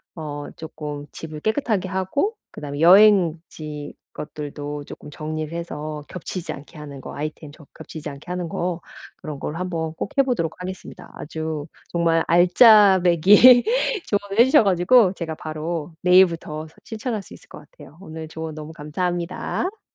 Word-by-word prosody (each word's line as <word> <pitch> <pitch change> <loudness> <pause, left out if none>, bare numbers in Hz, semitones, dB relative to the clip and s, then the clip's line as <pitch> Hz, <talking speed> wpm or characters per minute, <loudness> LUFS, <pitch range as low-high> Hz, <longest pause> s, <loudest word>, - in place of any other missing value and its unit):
어 145 -3 -6
쪼끔 150 -2 -7
집을 155 -2 -8
깨끗하게 220 - -1
하고 190 - -1 0.2
그다음에 145 -1 -7
여행지 165 -6 +3 0.2
것들도 145 -1 -6
쪼끔 145 - -11
정리를 155 +1 -5
해서 155 -3 -6
겹치지 180 -2 -6
않게 145 +2 -13
하는 145 -2 -9
거 - - -9
아이템 150 0 -6
저 155 0 -16
겹치지 155 -1 -8
않게 140 +4 -11
하는 180 -1 -3
거 175 0 -3 0.4
그런 150 -3 -7
걸 150 - -5
한번 165 -2 -3
꼭 190 - -5
해 275 - +6
보도록 230 -12 -1
하겠습니다. 185 0 -8
아주 155 -1 -5 0.3
정말 165 -1 +2
알짜배기 195 +4 +7 0.4
조언을 205 0 -2
해 - - +10
주셔 265 -1 +5
가지고 195 +2 +4
제가 165 -4 -5
바로 155 +1 -5
내일부터 170 -4 +3
서 160 - -21
실천할 225 -1 -4
수 - - -14
있을 - - -15
것 - - -11
같아요. - - -15
오늘 160 -4 -8
조언 160 0 -6
너무 155 +1 -8
감사합니다. 175 - -3
165 Hz, 330 characters per minute, -22 LUFS, 155-190 Hz, 0.4 s, 해